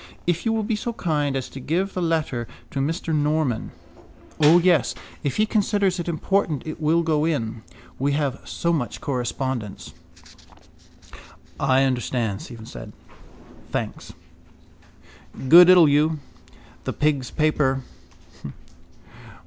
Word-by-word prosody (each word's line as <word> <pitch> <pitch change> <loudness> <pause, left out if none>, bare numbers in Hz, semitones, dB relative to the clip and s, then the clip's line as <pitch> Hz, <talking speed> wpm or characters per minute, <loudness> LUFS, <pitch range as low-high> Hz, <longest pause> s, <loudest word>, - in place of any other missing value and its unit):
If 175 +5 0
you - - +2
will 220 -1 0
be 220 +1 -1
so 235 +3 -4
kind 150 -8 -1
as 130 -2 -2
to 135 - -9
give 175 +9 -1
the 185 - -2
letter 155 -8 -1 0.2
to 140 - -3
Mr 160 +3 -2
Norman... 150 -5 0 0.7
—O, 155 +3 +7
yes. 175 -5 +3 0.3
If 140 -2 -2
he 215 - +4
considers 205 -3 +1
it 175 - -4
important 170 -3 0
it 155 0 -6
will 165 +2 +2
go 155 -2 +1
in. 115 -8 -2 0.4
We 140 +2 +1
have 140 -2 -1
so 170 0 -1
much 140 -7 -2
correspondence. 125 -4 -4 1.7
—I 135 0 +3
understand, 120 -5 -1
Stephen 115 -3 -10
said. - - -10 0.8
Thanks. - - -4 1.4
God 175 +3 +10
ild 180 -3 +8
you. 155 +2 +2 0.7
The - - -2
pigs' 140 -5 0
paper. 140 -4 +1
150 Hz, 125 wpm, -23 LUFS, 135-170 Hz, 1.7 s, God